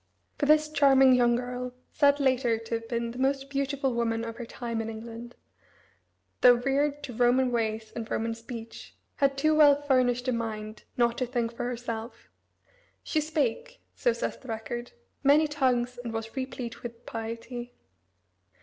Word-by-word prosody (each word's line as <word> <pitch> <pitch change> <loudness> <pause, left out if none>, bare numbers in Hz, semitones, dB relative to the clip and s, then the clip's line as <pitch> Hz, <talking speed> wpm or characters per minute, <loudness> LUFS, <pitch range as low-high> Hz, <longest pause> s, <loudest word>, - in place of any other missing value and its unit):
For 285 - +1
this 305 0 +5
charming 275 -3 +5
young 240 -1 +4
girl 250 0 -4 0.2
said, 285 -1 +4
later, 255 -4 +2
to 225 +1 -7
have 230 0 -2
been 235 0 -2
the 245 - -8
most 275 +1 0
beautiful 275 -1 -1
woman 230 -1 0
of 230 0 -6
her 240 - -6
time 230 -2 -4
in 225 - -4
England 230 +2 -8 1.1
though 245 -1 +8
reared 280 +4 0
to 255 - -6
Roman 250 +2 +3
ways 220 -2 -2
and 230 -1 -5
Roman 225 +1 -1
speech, 230 0 -9 0.2
had 275 -1 +2
too 310 +2 +3
well 290 -2 +6
furnished 255 -3 +2
a - - +3
mind 215 -2 -4
not 235 -1 +2
to 255 - 0
think 235 -2 -1
for 235 - -4
herself. 235 -2 -5 0.7
"She 310 - 0
spake," 315 - -2
so - - +1
says - - -3
the 260 - -15
record, 240 +1 -5 0.3
"many 295 +3 +5
tongues 250 -4 0
and 235 - -4
was 225 +1 -5
replete 250 -3 -5
with 235 0 -9
piety." 230 +2 -6
245 Hz, 165 wpm, -28 LUFS, 230-275 Hz, 1.1 s, though